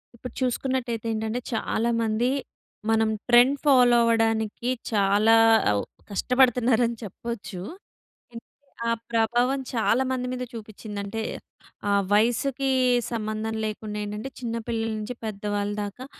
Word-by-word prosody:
ఇప్పుడు 245 0 -9
చూసుకున్నట్టయితే 250 -2 -1
ఏంటంటే, 220 +2 -2
చాలామంది 230 +1 0 0.6
మనం 225 0 +3 0.2
ట్రెండ్ 245 +4 +6
ఫాలో 250 -4 +6
అవ్వడానికి 225 0 +1 0.2
చాలా 205 +1 +4 0.4
అవు 100 -1 0 0.3
కష్టపడతన్నారని 245 0 +3
చెప్పచ్చు. 210 -1 -6 0.7
ఏంటి 230 - -9 0.4
ఆ - - +2 0.2
ప్రభావం 240 +4 +2
చాలామంది 255 +2 +1
మీద 250 0 -3
చూపిచ్చింది. 215 -1 -8
అంటే, 210 +3 -4 0.7
ఆ - - +2 0.2
వయసుకీ 245 +5 +2 0.4
సంబంధం 215 0 -3
లేకుండేంటంటే, 210 +2 -4
చిన్న 230 -2 -3
పిల్లల 225 -1 -1
నించి 215 +4 -5
పెద్ద 210 -2 -6
వాళ్ళ 205 0 -1
దాకా, 205 +6 -7
225 Hz, 105 wpm, -25 LUFS, 215-245 Hz, 0.7 s, ట్రెండ్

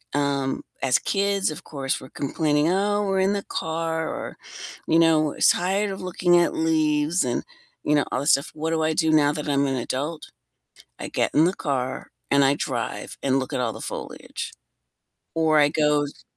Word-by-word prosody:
Um, 140 -2 0 0.2
as 130 -2 +3
kids, 200 -1 0
of 155 - -7
course, 135 -3 -3
we're 130 - -12
complaining, 150 +2 0
"Oh, 205 +2 +1
we're 195 -1 +1
in 195 +1 +2
the 200 -1 -2
car," 160 0 -2
or, - - -6 0.5
you 165 - +4
know, 155 -2 +3
"Tired 195 +3 +3
of 190 - -6
looking 175 -1 +2
at 175 - +3
leaves," 155 +1 +2
and, 120 -1 -1 0.4
you 150 - +2
know, 145 - +2
all - - 0
this 145 +4 +3
stuff 140 +2 +2
what 160 +1 -3
do 160 -1 +1
I 155 0 +1
do 160 0 +2
now 150 -2 +4
that 150 0 -4
I'm 140 0 +2
an 135 - 0
adult? 145 +6 -4 0.7
I - - -5
get - - 0
in 155 - +5
the 185 - +2
car, 130 -6 -3 0.2
and 140 0 +4
I 135 +1 +4
drive, 125 -4 -4
and 135 0 +2
look 130 - -5
at - - -1
all 115 -3 -1
the - - -9
foliage. - - -6 0.8
Or 160 -2 +3
I 145 - +5
go 150 -1 +2
s 145 - -8
155 Hz, 195 wpm, -24 LUFS, 140-165 Hz, 0.8 s, in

